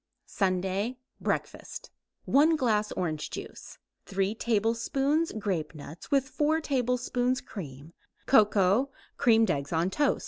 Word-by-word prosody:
SUNDAY 195 Hz, +5 st, -1 dB, 0.2 s
BREAKFAST -, -, -4 dB, 0.3 s
1 305 Hz, +4 st, +4 dB
glass 220 Hz, -7 st, +1 dB
orange 155 Hz, -4 st, -3 dB
juice; -, -, -9 dB, 0.3 s
3 195 Hz, +1 st, 0 dB
tablespoons 235 Hz, +8 st, 0 dB
grapenuts 165 Hz, -6 st, -5 dB
with 275 Hz, -1 st, +2 dB
4 305 Hz, +3 st, +1 dB
tablespoons 250 Hz, -2 st, 0 dB
cream; 150 Hz, -4 st, -9 dB, 0.3 s
cocoa; 210 Hz, +1 st, +4 dB, 0.3 s
creamed 225 Hz, -4 st, +4 dB
eggs 140 Hz, 0 st, -3 dB
on 170 Hz, +3 st, +1 dB
toast. 290 Hz, +3 st, +1 dB
220 Hz, 105 wpm, -28 LUFS, 185-260 Hz, 0.3 s, 1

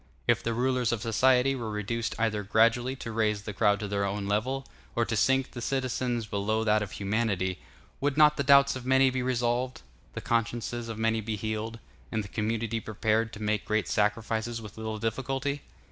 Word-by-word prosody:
If -, -, +3 dB
the 115 Hz, 0 st, -2 dB
rulers 125 Hz, -1 st, +1 dB
of 120 Hz, -2 st, -2 dB
society 125 Hz, +3 st, +3 dB
were 120 Hz, -4 st, -4 dB
reduced 110 Hz, +2 st, -2 dB
either 110 Hz, -2 st, 0 dB
gradually 115 Hz, +5 st, +2 dB
to 115 Hz, -3 st, -6 dB
raise 105 Hz, -2 st, 0 dB
the 105 Hz, -, -5 dB
crowd 105 Hz, 0 st, +3 dB
to 105 Hz, -, -3 dB
their 100 Hz, 0 st, -1 dB
own 100 Hz, 0 st, -2 dB
level, 125 Hz, +7 st, -1 dB, 0.3 s
or 115 Hz, -, +2 dB
to 115 Hz, -, -2 dB
sink 130 Hz, +4 st, +2 dB
the 120 Hz, -, -7 dB
citizens 125 Hz, -2 st, -1 dB
below 105 Hz, +2 st, -1 dB
that 110 Hz, -1 st, +3 dB
of 105 Hz, -, -5 dB
humanity, 100 Hz, -3 st, -1 dB, 0.4 s
would 145 Hz, 0 st, 0 dB
not 150 Hz, -1 st, +6 dB
the 140 Hz, -, -1 dB
doubts 140 Hz, 0 st, +6 dB
of 130 Hz, -, -6 dB
many 130 Hz, +1 st, +4 dB
be 130 Hz, 0 st, -1 dB
resolved, 125 Hz, -, -1 dB, 0.3 s
the -, -, -4 dB
consciences 115 Hz, 0 st, -1 dB
of 110 Hz, -, -5 dB
many 115 Hz, 0 st, +1 dB
be 110 Hz, 0 st, -3 dB
healed, 110 Hz, +2 st, -3 dB, 0.3 s
and 110 Hz, -2 st, -1 dB
the -, -, -8 dB
community 115 Hz, +1 st, -1 dB
prepared 110 Hz, +1 st, 0 dB
to 105 Hz, -, -7 dB
make 105 Hz, -1 st, 0 dB
great 110 Hz, 0 st, 0 dB
sacrifices 110 Hz, +2 st, 0 dB
with 105 Hz, -3 st, -10 dB
little 110 Hz, 0 st, -4 dB
difficulty? 135 Hz, +5 st, -2 dB
115 Hz, 190 wpm, -28 LUFS, 105-125 Hz, 0.4 s, not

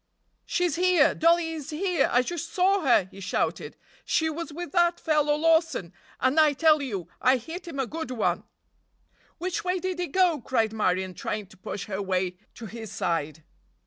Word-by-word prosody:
"She's 355 Hz, -4 st, 0 dB
here! 360 Hz, -4 st, +4 dB
Dollie 335 Hz, 0 st, +3 dB
is 310 Hz, -2 st, -6 dB
here! 355 Hz, +3 st, +1 dB
I 245 Hz, +1 st, +4 dB
just 340 Hz, +3 st, -5 dB
saw 385 Hz, +2 st, +2 dB
her!" 245 Hz, -, +4 dB
he 195 Hz, -, -12 dB
shouted. 195 Hz, -, -2 dB, 0.3 s
"She 320 Hz, -1 st, +1 dB
was 330 Hz, 0 st, -5 dB
with 345 Hz, +3 st, -6 dB
that 345 Hz, -1 st, +2 dB
fellow 300 Hz, -2 st, +2 dB
Lawson, 320 Hz, -, +1 dB, 0.3 s
and, 260 Hz, +5 st, +2 dB
I 305 Hz, -2 st, +5 dB
tell 310 Hz, +1 st, +4 dB
you, 200 Hz, -, -4 dB
I 255 Hz, +1 st, +4 dB
hit 330 Hz, +9 st, -8 dB
him 330 Hz, -, -7 dB
a 270 Hz, -, +1 dB
good 320 Hz, +2 st, -5 dB
one!" 250 Hz, -4 st, 0 dB, 0.9 s
"Which 360 Hz, +2 st, -3 dB
way 365 Hz, +1 st, 0 dB
did 370 Hz, 0 st, -3 dB
they 355 Hz, 0 st, -2 dB
go?" 345 Hz, -3 st, +2 dB
cried 225 Hz, -3 st, 0 dB
Marion, 185 Hz, -3 st, 0 dB
trying 210 Hz, +3 st, -4 dB
to 190 Hz, -, -18 dB
push 185 Hz, +1 st, -6 dB
her 200 Hz, -2 st, -4 dB
way 185 Hz, -2 st, -1 dB, 0.2 s
to 235 Hz, -, -8 dB
his 220 Hz, -1 st, -8 dB
side. 160 Hz, -6 st, -2 dB
300 Hz, 180 wpm, -26 LUFS, 215-340 Hz, 0.9 s, I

